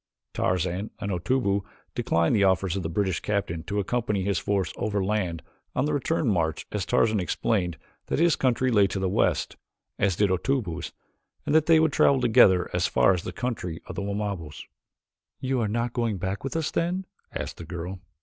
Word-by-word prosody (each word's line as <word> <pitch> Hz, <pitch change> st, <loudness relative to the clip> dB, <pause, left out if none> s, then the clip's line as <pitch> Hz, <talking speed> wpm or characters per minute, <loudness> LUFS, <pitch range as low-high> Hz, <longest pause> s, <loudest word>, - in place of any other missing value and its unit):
Tarzan 90 Hz, +3 st, -1 dB
and 100 Hz, -, -3 dB
Otobu 100 Hz, +2 st, +1 dB, 0.3 s
declined 85 Hz, +5 st, +1 dB
the 100 Hz, -, +3 dB
offers 95 Hz, -1 st, +2 dB
of 95 Hz, -, -1 dB
the 80 Hz, -, -3 dB
British 95 Hz, 0 st, 0 dB
captain 100 Hz, -6 st, -2 dB
to 100 Hz, -, -3 dB
accompany 105 Hz, -1 st, -1 dB
his 100 Hz, +1 st, 0 dB
force 100 Hz, -2 st, -1 dB
overland 100 Hz, -5 st, -1 dB, 0.3 s
on 130 Hz, -, +1 dB
the 150 Hz, -, 0 dB
return 145 Hz, +1 st, 0 dB
march 85 Hz, -7 st, 0 dB
as 105 Hz, -3 st, -2 dB
Tarzan 110 Hz, -2 st, +3 dB
explained 90 Hz, -1 st, 0 dB, 0.3 s
that -, -, -1 dB
his 165 Hz, 0 st, +4 dB
country 130 Hz, 0 st, +1 dB
lay 100 Hz, -3 st, +5 dB
to 95 Hz, -, -4 dB
the 95 Hz, 0 st, 0 dB
west, 90 Hz, -, 0 dB, 0.4 s
as 100 Hz, -3 st, +2 dB
did 100 Hz, +1 st, +2 dB
Otobu's, 95 Hz, -2 st, -1 dB, 0.5 s
and -, -, 0 dB
that 155 Hz, 0 st, +4 dB
they 165 Hz, -1 st, +6 dB
would 160 Hz, -2 st, +2 dB
travel 140 Hz, -, +4 dB
together 100 Hz, -7 st, +5 dB
as -, -, +2 dB
far 95 Hz, -, +4 dB
as 90 Hz, -, -2 dB
the -, -, -5 dB
country 100 Hz, -10 st, -4 dB
of -, -, -7 dB
the -, -, -4 dB
Wamabos. 100 Hz, -7 st, -4 dB, 0.8 s
"You 130 Hz, -1 st, 0 dB
are 110 Hz, -, +1 dB
not 115 Hz, +3 st, -1 dB
going 115 Hz, -5 st, 0 dB
back 95 Hz, +2 st, -3 dB
with 135 Hz, -, -4 dB
us, 160 Hz, -2 st, -1 dB
then?" 180 Hz, +3 st, -1 dB, 0.3 s
asked -, -, -5 dB
the -, -, -8 dB
girl. 85 Hz, +3 st, -6 dB
100 Hz, 190 wpm, -26 LUFS, 90-120 Hz, 0.8 s, they